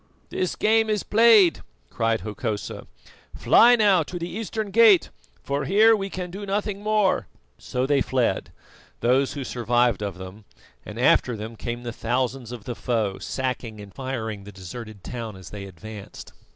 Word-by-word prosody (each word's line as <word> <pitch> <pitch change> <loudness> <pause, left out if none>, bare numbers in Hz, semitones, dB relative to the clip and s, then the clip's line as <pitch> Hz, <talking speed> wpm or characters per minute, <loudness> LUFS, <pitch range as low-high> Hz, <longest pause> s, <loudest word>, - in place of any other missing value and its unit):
"This 185 - -1
game 220 0 +2
is 210 -2 0
played!" 210 - +5 0.3
cried 115 -3 0
Hokosa. 105 +1 -5 0.5
"Fly 245 +1 +6
now 205 -6 +4
to 175 +3 -5
the 170 0 -4
eastern 215 +2 -4
gate, 220 -5 +6 0.3
for 140 +1 -2
here 220 +4 +5
we 195 -2 -4
can 180 -2 -5
do 200 +3 -7
nothing 200 0 -2
more." 210 -2 +1 0.3
So 125 +1 -2
they 140 0 +2
fled, 130 -3 0 0.5
those 130 +3 +2
who 140 -2 -5
survived 120 -3 +1
of 100 -3 -4
them, 95 +3 -10 0.4
and - - -8
after 120 -3 +3
them 110 +2 -7
came 120 +2 -5
the 120 -1 -5
thousands 125 +1 -2
of 120 -4 -8
the 120 - -4
foe, 110 -5 -2
sacking 125 -4 -4
and 100 -1 -11
firing 110 -6 -5
the 105 - -10
deserted 100 +2 -9
town 115 -4 -6
as 95 -2 -12
they 100 -1 -7
advanced. 100 +2 -10
125 Hz, 165 wpm, -24 LUFS, -, 0.5 s, Fly